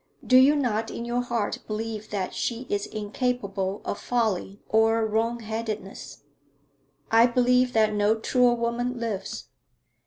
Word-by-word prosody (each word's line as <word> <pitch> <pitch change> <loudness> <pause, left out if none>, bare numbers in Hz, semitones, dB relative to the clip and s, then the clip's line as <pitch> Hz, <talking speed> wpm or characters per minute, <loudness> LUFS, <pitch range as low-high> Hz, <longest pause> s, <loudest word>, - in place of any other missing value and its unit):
'Do 255 - +3
you 265 +3 +7
not 225 -6 0
in 235 - -5
your 240 +1 0
heart 235 -4 -2
believe 215 0 -4
that 195 -3 -3
she 240 +1 -3
is 205 0 -1
incapable 205 -3 -3
of - - -3
folly 210 -5 -1
or 225 0 +3
wrongheadedness?' 220 -2 -3 0.9
'I 230 +2 +6
believe 250 +1 +2
that 215 -1 +3
no 210 +1 +2
truer 245 +2 +2
woman 240 +1 -2
lives.' 220 -5 -4
225 Hz, 130 wpm, -26 LUFS, 210-245 Hz, 0.9 s, you